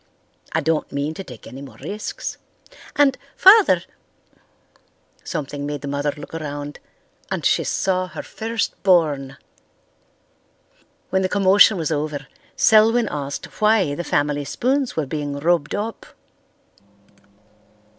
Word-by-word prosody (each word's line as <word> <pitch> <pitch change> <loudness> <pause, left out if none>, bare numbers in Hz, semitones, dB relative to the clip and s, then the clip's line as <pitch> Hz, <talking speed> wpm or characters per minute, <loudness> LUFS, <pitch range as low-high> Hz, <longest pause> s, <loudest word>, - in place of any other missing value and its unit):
I 160 - 0
don't 160 +1 -1
mean 140 +2 -2
to 195 - -7
take 125 -10 -12
any 130 +4 -9
more 140 -2 -11
risks. 210 +1 -5 0.6
And, 280 -2 +4 0.2
Father——" 405 +2 +7 1.4
Something 145 0 -4
made 145 -1 -4
the 145 - -6
mother 145 +1 -1
look 145 - -10
around, 145 -2 -5 0.5
and - - -3
she - - +3
saw 185 -1 0
her - - -7
first 225 -1 -3
born! 150 -8 +2 1.7
When 190 - +2
the 185 - 0
commotion 200 +1 +5
was 160 -2 -2
over 150 -1 -2 0.3
Selwyn 225 +1 +5
asked 140 -1 -4 0.2
why 210 -8 +3
the 175 - -4
family 145 -2 0
spoons 260 - -1
were 155 - 0
being 145 0 -4
rubbed 160 0 +1
up. 215 +2 -5
160 Hz, 125 wpm, -21 LUFS, 145-205 Hz, 1.7 s, Father